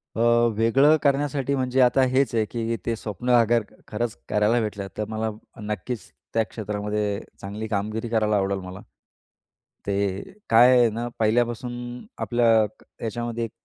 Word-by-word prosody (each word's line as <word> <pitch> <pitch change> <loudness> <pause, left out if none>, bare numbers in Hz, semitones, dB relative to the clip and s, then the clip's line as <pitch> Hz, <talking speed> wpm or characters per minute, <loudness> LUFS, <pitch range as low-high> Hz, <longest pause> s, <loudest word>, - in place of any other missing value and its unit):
अ, - - -4 0.4
वेगळं 135 +7 +5
करण्यासाठी 140 -1 +1
म्हणजे 130 0 0
आता 125 +1 +4
हेच 130 +1 +1
आहे, 110 - +3
की 115 +1 -3
ते 115 - 0
स्वप्न 110 +2 -5
अगर 115 0 +3 0.2
खरंच 115 +1 -3
करायला 105 +3 +2
भेटलं, 100 -2 -4
तर 105 - -1
मला 110 0 -2 0.3
नक्कीच 105 +3 -5 0.2
त्या 115 - +3
क्षेत्रामध्ये 105 -1 -3 0.2
चांगली 105 +3 -5
कामगिरी 110 +2 -2
करायला 110 -2 +1
आवडेल 100 0 0
मला. 90 0 -8 1.1
ते 100 -1 0 0.3
काय 125 +3 +7
आहे 120 -2 +5
ना, 115 +2 -4
पहिल्यापासून 120 +2 +1 0.5
आपल्या 120 -1 +2 0.6
याच्यामध्ये 120 +1 -3
एक 115 - -9
115 Hz, 140 wpm, -24 LUFS, 105-120 Hz, 1.1 s, काय